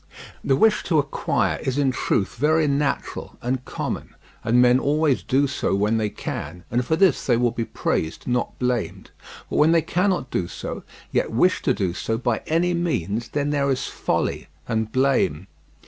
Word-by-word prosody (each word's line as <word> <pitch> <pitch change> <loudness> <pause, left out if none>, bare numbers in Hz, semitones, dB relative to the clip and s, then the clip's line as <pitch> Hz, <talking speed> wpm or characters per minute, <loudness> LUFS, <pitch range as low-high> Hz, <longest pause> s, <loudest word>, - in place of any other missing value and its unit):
The 135 - +3
wish 215 +8 +4
to 165 - +2
acquire 140 -2 0
is 130 0 -2
in 140 -2 +2
truth 105 -5 0
very 155 +4 +2
natural 140 0 -2
and 125 +1 -2
common, - - -5 0.3
and 120 +2 +3
men 125 +1 +5
always 145 0 +2
do 140 +2 +2
so 140 -7 -1
when 105 +3 +1
they 110 -1 0
can, 85 -2 -6
and 120 +2 +1
for 160 - +1
this 185 -4 +3
they 120 -3 +4
will 120 0 +2
be 115 - -3
praised 80 -6 -2
not 125 -1 -1
blamed; 125 -3 -2 0.4
but - - -3
when 155 +2 +5
they 165 -2 +3
cannot 180 -5 0
do 85 - -1
so, - - -6 0.3
yet - - 0
wish 180 +11 +2
to 130 - +2
do 95 -4 -1
so 115 +5 -2
by 120 -1 -1
any 170 +3 +2
means, 120 - -1
then 145 0 -1
there 140 -1 +1
is 130 -1 0
folly - - -2 0.2
and 110 -1 -1
blame. 130 - +1
130 Hz, 180 wpm, -23 LUFS, 115-150 Hz, 0.4 s, men